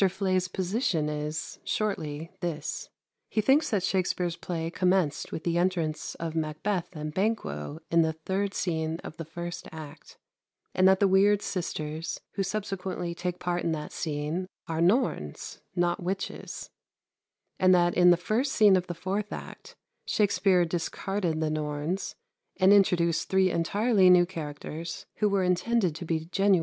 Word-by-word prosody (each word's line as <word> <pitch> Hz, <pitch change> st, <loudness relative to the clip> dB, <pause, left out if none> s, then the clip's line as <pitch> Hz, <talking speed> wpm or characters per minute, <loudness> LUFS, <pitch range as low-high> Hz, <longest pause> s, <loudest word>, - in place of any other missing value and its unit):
Fleay's 185 Hz, -1 st, 0 dB
position 185 Hz, -, 0 dB
is, 150 Hz, 0 st, -4 dB
shortly, 165 Hz, -7 st, -2 dB
this. 160 Hz, -4 st, -4 dB, 0.4 s
He -, -, -1 dB
thinks 275 Hz, +8 st, +4 dB
that 205 Hz, -6 st, 0 dB
Shakspere's 180 Hz, -2 st, 0 dB
play 165 Hz, -1 st, -4 dB
commenced 180 Hz, -5 st, +1 dB
with 160 Hz, -, -5 dB
the 170 Hz, 0 st, +1 dB
entrance 170 Hz, -4 st, -1 dB
of 165 Hz, -1 st, -4 dB
Macbeth 165 Hz, +4 st, -2 dB
and 150 Hz, 0 st, -5 dB
Banquo 165 Hz, -, -1 dB
in 170 Hz, 0 st, +5 dB
the 160 Hz, 0 st, +1 dB
third 190 Hz, +5 st, -2 dB
scene 160 Hz, -2 st, -1 dB
of -, -, -8 dB
the 165 Hz, -, -5 dB
first 170 Hz, +2 st, -6 dB
act, 155 Hz, -1 st, -10 dB, 0.6 s
and 185 Hz, 0 st, +5 dB
that 190 Hz, 0 st, +5 dB
the 200 Hz, -, +6 dB
weird 200 Hz, +2 st, +4 dB
sisters 160 Hz, -3 st, -3 dB
who 200 Hz, -, -2 dB
subsequently 190 Hz, -3 st, -3 dB
take 180 Hz, 0 st, -3 dB
part 175 Hz, 0 st, -2 dB
in 165 Hz, -, +1 dB
that 150 Hz, -1 st, -5 dB
scene 155 Hz, +4 st, -3 dB, 0.2 s
are 165 Hz, -1 st, -1 dB
Norns, 180 Hz, -, 0 dB, 0.2 s
not 175 Hz, 0 st, +1 dB
witches; 190 Hz, +2 st, -4 dB, 0.9 s
and 185 Hz, 0 st, +5 dB
that 175 Hz, -1 st, +3 dB
in 180 Hz, 0 st, +6 dB
the 175 Hz, -, +6 dB
first 225 Hz, +10 st, 0 dB
scene 210 Hz, -3 st, +6 dB
of 185 Hz, -1 st, 0 dB
the 175 Hz, -, -4 dB
fourth 200 Hz, +4 st, -3 dB
act, -, -, -8 dB, 0.3 s
Shakspere 195 Hz, -4 st, +3 dB
discarded 175 Hz, +1 st, -2 dB
the 155 Hz, -1 st, 0 dB
Norns, 155 Hz, +4 st, -2 dB, 0.4 s
and 190 Hz, +1 st, +6 dB
introduced 175 Hz, -4 st, +3 dB
three 190 Hz, -1 st, +3 dB
entirely 200 Hz, +3 st, +3 dB
new 180 Hz, -1 st, +7 dB
characters, 165 Hz, +2 st, -6 dB
who 210 Hz, -, +2 dB
were 200 Hz, -1 st, +2 dB
intended 180 Hz, +1 st, +2 dB
to 160 Hz, +3 st, -7 dB
be 160 Hz, -1 st, -1 dB
genuine 195 Hz, +3 st, +3 dB
witches. -, -, +2 dB
175 Hz, 155 wpm, -28 LUFS, 160-195 Hz, 0.9 s, new